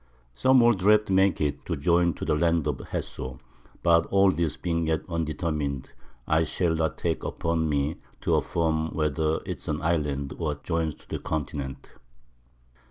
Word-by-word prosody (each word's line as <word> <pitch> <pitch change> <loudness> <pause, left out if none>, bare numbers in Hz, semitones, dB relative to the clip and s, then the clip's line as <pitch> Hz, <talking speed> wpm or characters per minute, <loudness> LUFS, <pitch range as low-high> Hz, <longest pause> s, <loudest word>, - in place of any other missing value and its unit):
Some 130 - +5
old 120 -4 +4
Draughts 105 +2 +4
make 95 -1 +3
it 75 -2 -1
to - - -1
join 85 +3 +2
to - - -5
the - - +1
Land 85 0 +2
of 75 -4 -2
Jesso, 65 0 -5 0.4
but 85 -1 +4
all 95 0 +4
this 85 -2 -1
being 85 -2 -1
yet 80 -1 0
undetermin'd, 75 -4 -2 0.4
I 80 +1 +3
shall 85 +2 0
not 80 -2 -1
take - - -1
upon 80 -1 -1
me 70 +1 0 0.2
to - - +1
affirm 80 -1 0
whether 75 0 0
it's - - -5
an 75 - -1
Island, 75 -4 -1
or 75 -3 -1
joins 80 0 -2
to - - -20
the - - -4
Continent. 70 -3 -4
80 Hz, 165 wpm, -26 LUFS, 75-85 Hz, 0.4 s, Some